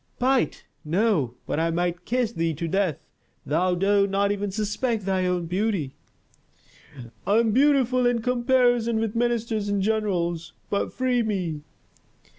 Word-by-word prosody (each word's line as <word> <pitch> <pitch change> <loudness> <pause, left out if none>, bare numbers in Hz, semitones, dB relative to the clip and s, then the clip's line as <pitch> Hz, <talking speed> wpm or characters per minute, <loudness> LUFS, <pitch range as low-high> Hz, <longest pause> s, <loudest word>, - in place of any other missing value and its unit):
"Bite? 260 +1 +1 0.2
No! 165 - +1
But - - -2
I 165 +1 +1
might 175 +1 -2
kiss 245 -2 0
thee 165 -6 -1
to 165 +3 -3
death. 185 -3 -1 0.4
Thou 180 +5 +1
dost 200 +2 +2
not 200 +1 +1
even 205 0 -2
suspect 215 +2 -2
thy 190 -1 +1
own 180 -1 -1
beauty." 185 -5 -1 1.3
"I 205 - +4
am 230 -1 +3
beautiful 255 -1 +3
in 240 -2 0
comparison 245 -2 +2
with 225 -1 -2
ministers 230 -3 0
and 205 0 0
generals. 185 -5 -1 0.2
But 200 - 0
free 255 -1 +1
me." 185 -9 -2
205 Hz, 140 wpm, -25 LUFS, 180-235 Hz, 1.3 s, I